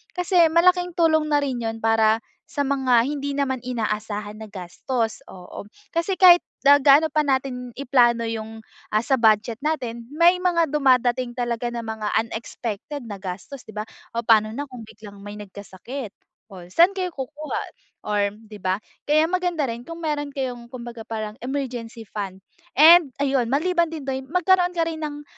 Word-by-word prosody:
kasi 355 -2 +4
malaking 355 +2 +3
tulong 315 -2 +3
na 295 -1 +2
rin 260 -3 -2
yun 225 -1 -3
para, 225 0 +3 0.3
sa 290 - -5
mga 265 -4 +2
hindi 285 -1 -3
naman 275 -3 -2
inaasahan 210 -3 -3
na 220 -2 -10
gastos, 220 +5 -3
oo. 180 +1 -10 0.3
Kasi 340 +3 -1
kahit 355 -2 +8 0.2
na 285 - +9
gaano 285 +2 +5
pa 305 0 +1
natin 260 -3 -2
i-plano 240 -3 +2
yung, 225 0 -5 0.3
ah, 215 - +3
sa 265 +3 +1
budget 220 -1 +2
natin, 245 -7 -2
may 340 +4 +5
mga 340 -2 +2
dumadating 255 -3 +2
talaga 240 -1 -2
na 235 - -4
mga 220 -2 -4
unexpected 230 +3 -5
na 205 - -5
gastos, 195 +8 -7
'di 220 - -12
ba? 215 +1 -5 0.3
Oh, 235 - -1
pano 215 -1 +5
na 285 +6 -5
kung 250 -3 -9
biglang 210 -1 -13
may 205 - -8
nagkasakit, 205 +4 -8 0.4
o 185 -2 -10
saan 340 - +5
kayo 370 -2 -2
kukuha, 295 +3 -4 0.4
or, 210 -1 0
'di 215 -1 -13
ba? 185 +1 0 0.3
Kaya 305 +2 +4
maganda 355 -4 0
rin 235 -2 -5
kung 330 0 -8
meron 295 -2 -1
kayong 255 -4 -5
kumbaga 240 -1 -8
parang 215 -1 -4
emergency 245 -3 -5
fund, 195 -3 -7 0.3
and 325 0 +8
ayun, 265 -4 +1
maliban 340 +4 +1
din 315 -3 -7
doon, 265 -1 -4
magkaroon 360 +2 +2
ka 335 - +2
rin 320 -1 -4
ng, 295 -1 -5
255 Hz, 170 wpm, -23 LUFS, 225-300 Hz, 0.4 s, na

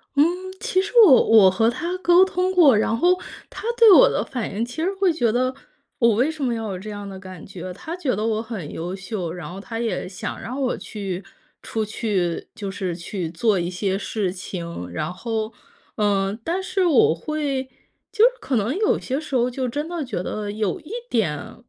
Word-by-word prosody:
嗯， 285 - +6 0.4
其 370 - +1
实 395 - -5
我 270 -9 +7
我 210 -4 +7
和 225 +5 +3
他 350 +8 -3
沟 355 +1 +6
通 370 0 0
过， 315 -9 +6
然 220 +1 +1
后 360 +6 +3 0.3
他 - - -9
对 455 -2 +8
我 - - +8
的 - - 0
反 245 -8 -4
应 220 +4 -1
其 245 - -10
实 370 - +1
会 375 -3 +3
觉 240 -8 +1
得， 255 +3 +1 0.5
我 235 -3 +5
为 250 +7 +2
什 310 -3 -6
么 245 -3 +1
要 225 -2 -3
有 185 - -5
这 210 +3 -8
样 205 -1 -6
的 190 -1 -8
感 185 -3 -10
觉？ 185 -1 -7
他 320 - -6
觉 300 - -1
得 210 +2 -2
我 220 -1 0
很 220 -9 -6
优 175 +3 -4
秀， 195 -3 -4
然 175 0 -7
后 190 - -7
他 225 +3 -6
也 225 -6 -2
想 185 - -6
让 255 +4 -5
我 260 -2 0
去 195 -3 -5 0.4
出 220 -1 -2
去 200 -6 -2
就 205 -4 -5
是 185 -3 -3
去 170 0 -5
做 195 +4 +1
一 175 0 -2
些 190 +1 -1
事 200 -1 -2
情。 170 - -6
然 155 - -3
后， 220 +2 -3 0.4
嗯， 200 -1 +1
但 350 +7 -1
是 375 0 0
我 290 - +5
会 280 - -2 0.5
就 445 +1 +5
是 - - +5
可 265 - -1
能 225 +5 0
有 425 +2 +2
些 265 +2 -2
时 305 -3 -5
候 245 0 +3
就 255 +1 -3
真 295 +5 -3
的 340 -2 -3
觉 230 -9 -3
得 210 +2 -4
有 210 -3 -2
一 310 - -13 0.2
点 160 -10 -1
225 Hz, 225 characters per minute, -23 LUFS, 190-285 Hz, 0.5 s, 对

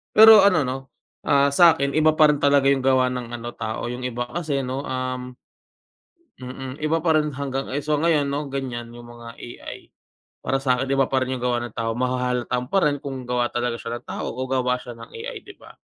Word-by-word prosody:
Pero 220 0 +10
ano, 180 -7 +4
'no, 130 0 -2 0.5
ah, 140 0 +4
sa'kin 140 -3 +5
iba 155 +1 +3
pa 155 -1 +6
rin 145 - -2
talaga 140 -1 +4
yung 135 -1 +1
gawa 130 -1 +3
ng 120 -1 -5
ano, 120 0 -6
tao, 115 +1 -4
yung 125 +1 -5
iba 120 0 -3
kasi 150 -5 -2
'no, 130 +1 -3
um 130 -1 -4 1.1
mm, 130 +3 -8
iba 160 +2 +1
pa 160 0 +1
rin 150 -1 +2
hanggang 135 -1 -4
ay, 140 - -2
so, 150 +1 -1
ngayon 150 -1 +2
'no, 140 0 -3
ganyan 125 -4 -5
yung 120 0 -12
mga 115 0 -11
AI. 120 - -10 0.5
Para 135 +2 -1
sa'kin 130 -1 0
iba 135 0 +3
pa 130 0 0
rin 130 0 -2
yung 125 - -6
gawa 120 -1 +1
ng 120 -2 -7
tao, 115 0 -1
mahahalata 125 0 -1
mo 125 - -3
pa 195 - +4
rin 145 - -1
kung 135 -3 -7
gawa 125 -1 0
talaga 120 -1 -1
siya 115 +1 -6
ng - - -39
tao - - -4
o 130 +2 -5
gawa 125 -1 0
siya 120 -2 -10
ng 115 0 -12
AI - - -7
'di - - -12
ba? - - -15
130 Hz, 220 wpm, -23 LUFS, 125-140 Hz, 1.1 s, Pero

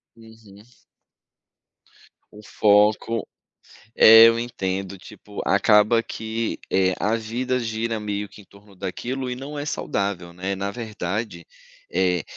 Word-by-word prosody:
Uhum. 110 -2 -17 1.7
O 105 - -13
foco 105 +2 +2 0.7
É, 115 +1 +9
eu 115 - +1
entendo. 95 -5 -4
Tipo, 100 +2 -11
acaba 105 +3 +4
que, 110 +1 -4
eh, 95 -1 +2
a 110 +2 +1
vida 125 +3 -2
gira, 115 0 -3
meio 105 -1 -4
que, 105 - -15
em - - -21
torno 100 +1 -20
daquilo, 125 +8 -4
e - - -3
não 145 +3 -7
é 145 - -4
saudável, 100 - -3
né? 95 +2 -3
Na 100 +1 -3
verdade, 105 -5 -5 0.5
eh, 90 -3 +1
105 Hz, 125 wpm, -23 LUFS, 100-115 Hz, 1.7 s, É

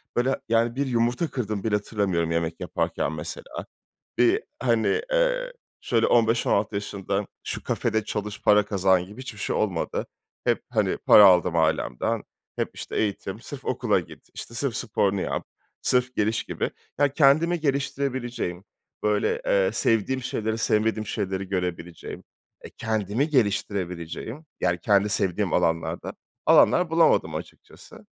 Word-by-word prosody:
Böyle, 130 +2 +1
yani, 115 +1 +2
bir 140 +1 0
yumurta 120 +6 +1
kırdığımı 110 -6 -3
bile 110 -2 +1
hatırlamıyorum 95 -6 -1
yemek 85 0 -1
yaparken - - -1
mesela. 75 -1 -7 0.5
Bir, 120 -1 +3 0.2
hani, 120 - +2
eee, - - +1 0.3
şöyle 115 -2 +2
15-16 115 -3 +2
yaşından 100 0 -3 0.2
şu - - -4
kafede 110 -1 0
çalış, 105 0 -4
para 105 0 +5
kazan 95 -3 +2
gibi 105 +7 -11
hiçbir 120 -5 -8
şey - - -1
olmadı. 95 -6 -1 0.4
Hep, - - +1
hani, - - +1
para 105 - +8
aldım 90 -2 +5
ailemden. 80 -6 0 0.3
Hep, - - -1
işte, - - -7
eğitim, 105 -3 -2
sırf - - -9
okula - - +1
git, - - -12
işte, 115 - -8
sırf 120 0 -2
sporunu 100 -4 0
yap, - - -2 0.4
sırf 125 0 +1
geliş 110 +2 +1
gibi. - - -3 0.3
Ya, 145 0 +4
kendimi 160 +4 +4
geliştirebileceğim, 130 - -2 0.4
böyle, 105 - +1
eee, - - +3
sevdiğim 120 +4 +1
şeyleri, 110 -1 -2
sevmediğim 110 0 +1
şeyleri 95 -3 -3
görebileceğim, 90 -2 -4 0.4
e, - - -10
kendimi 110 - -1
geliştirebileceğim, 100 - -1
yani, 85 - +1
kendi 105 0 +3
sevdiğim 95 -1 0
alanlarda 80 0 0 0.3
alanlar 180 -2 +5
bulamadım 160 - +3
açıkçası. 80 +1 -10
110 Hz, 135 wpm, -25 LUFS, 95-125 Hz, 0.5 s, para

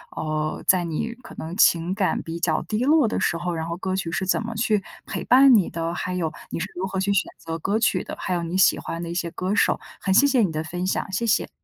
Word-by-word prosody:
呃， 155 0 -2
在 180 -2 +4
你 170 +8 -3
可 - - -12
能 165 +2 -6
情 175 -3 +4
感 195 -1 0
比 165 +1 -6
较 165 -2 +1
低 220 +3 -1
落 300 -1 +5
的 - - -1
时 170 - 0
候， 175 +1 -3
然 160 -1 -3
后 170 - -3
歌 185 +1 -3
曲 180 -3 -2
是 190 - -1
怎 185 - +1
么 230 +1 -5
去 215 -2 +1 0.2
陪 190 - -5
伴 265 +1 +7
你 205 -6 +4
的， 165 0 -3
还 180 +1 -3
有， 165 -3 -1 0.2
你 - - -3
是 170 - -2
如 190 +2 -2
何 190 0 -3
去 200 +1 +1
选 200 - +1
择 165 0 -6
歌 200 +6 0
曲 225 - +2
的， - - -7
还 185 - -3
有 175 -1 -1
你 170 +2 -2
喜 190 - +4
欢 165 +1 -5
的 170 - -5
一 - - -4
些 170 -1 -2
歌 185 +3 -3
手。 210 - +3 0.2
很 190 - 0
谢 275 - +6
谢 270 -3 +3
你 195 -6 +1
的 155 +1 -2
分 180 +3 -4
享， 195 - -2
谢 220 +5 -1
谢。 220 - +2
185 Hz, 295 characters per minute, -24 LUFS, 170-210 Hz, 0.2 s, 伴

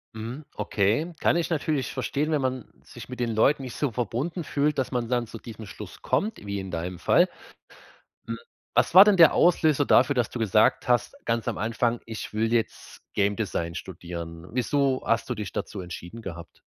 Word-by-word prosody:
Mhm, 115 +7 -6
okay, 110 - 0
kann - - +3
ich 170 0 -1
natürlich 150 -4 -1
verstehen, 150 +3 -1
wenn 150 - +1
man 130 -2 -2 0.2
sich - - -11
mit 125 - -7
den 120 -1 0
Leuten 135 +6 +3
nicht 125 -2 -7
so 145 -4 -1
verbunden 125 - -2
fühlt, 145 0 0
dass 130 - -1
man 120 -2 -1
dann 120 -1 0
zu 115 - -8
diesem 110 -2 -10
Schluss - - -10
kommt, 215 - -1
wie 100 0 -3
in 95 -1 -6
deinem 85 +2 -4
Fall. 175 - +4 1.0
Hm, - - -3 0.4
was - - +2
war 190 +3 +11
denn 210 - +5
der 165 -4 +7
Auslöser 155 -5 +3
dafür, 145 - +5
dass 125 -3 0
du 125 - -6
gesagt 110 +2 +3
hast, 125 - +2
ganz 115 -1 -1
am - - -1
Anfang: 115 +2 0
„Ich 110 -1 -7
will 110 +1 0
jetzt 115 -2 -2 0.2
Game 100 +1 +1
Design 85 -6 -2
studieren.“? 85 -2 -7
Wieso 130 +1 +1
hast 115 +1 +1
du - - -1
dich 105 -4 -6
dazu 100 - -4
entschieden 90 +4 -8
gehabt? 85 -5 -9
115 Hz, 195 wpm, -26 LUFS, 105-140 Hz, 1.0 s, war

